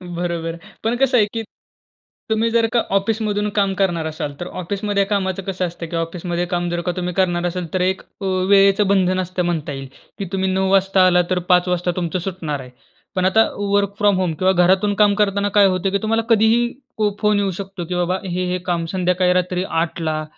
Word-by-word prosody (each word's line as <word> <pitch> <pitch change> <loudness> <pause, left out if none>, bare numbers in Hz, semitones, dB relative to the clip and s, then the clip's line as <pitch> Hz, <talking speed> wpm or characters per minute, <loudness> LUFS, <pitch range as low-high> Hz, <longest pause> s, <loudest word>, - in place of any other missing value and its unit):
बरोबर. 170 -1 -3 0.3
पण 225 +2 +1
कसं 265 -1 +3
आहे 215 - +5
की 225 -1 -3 0.9
तुम्ही 220 +1 +1
जर 230 0 +3
का 240 - +4 0.2
ऑफिसमधून 210 0 0
काम 200 -1 +2
करणार 170 -4 +1
असाल, 150 -2 -4
तर 175 - -5
ऑफिसमध्ये 200 +2 -2
कामाचं 195 -2 -1
कसं 185 -1 -2
असतं 170 0 -7
की 170 - -5
ऑफिसमध्ये 170 +1 -2
काम 175 0 0
जर 175 0 -2
का 180 - -1
तुम्ही 180 0 -2
करणार 175 -2 +1
असाल 180 0 -3
तर 185 - 0
एक 190 +1 0
अ, 195 - -11
वेळेचं 195 +1 +3
बंधन 185 -2 +2
असतं 185 0 -2
म्हणता 165 -3 -2
येईल 135 0 -7 0.3
की 200 - -2
तुम्ही 190 0 0
9:00 190 0 +1
वाजता 195 -1 +4
आलात 180 -1 +4
तर 185 - +1
5:00 180 0 +4
वाजता 180 0 0
तुमचं 180 0 -2
सुटणार 170 -5 -4
आहे. 130 -1 -10 0.5
पण 185 -1 +1
आता 220 +4 +5
वर्क 200 0 0
फ्रॉम 205 -1 +3
होम 180 -3 0
किंवा 185 0 +3
घरातून 190 +3 +3
काम 205 0 +4
करताना 205 -1 +1
काय 200 - +7
होतं 185 +1 0
की 200 - +2
तुम्हाला 225 +1 0
कधीही 225 +2 +4 0.3
पो 215 -1 +2
फोन 210 -1 +3
येऊ 200 -1 0
शकतो 190 -1 -6
की 180 - -2
बाबा 180 +1 0
हे, 180 0 -2
हे 180 - 0
काम 170 -2 -1
संध्याकाळी 180 0 +2
रात्री 180 0 0
8:00ला 165 -3 -2
185 Hz, 205 wpm, -20 LUFS, 175-200 Hz, 0.9 s, काय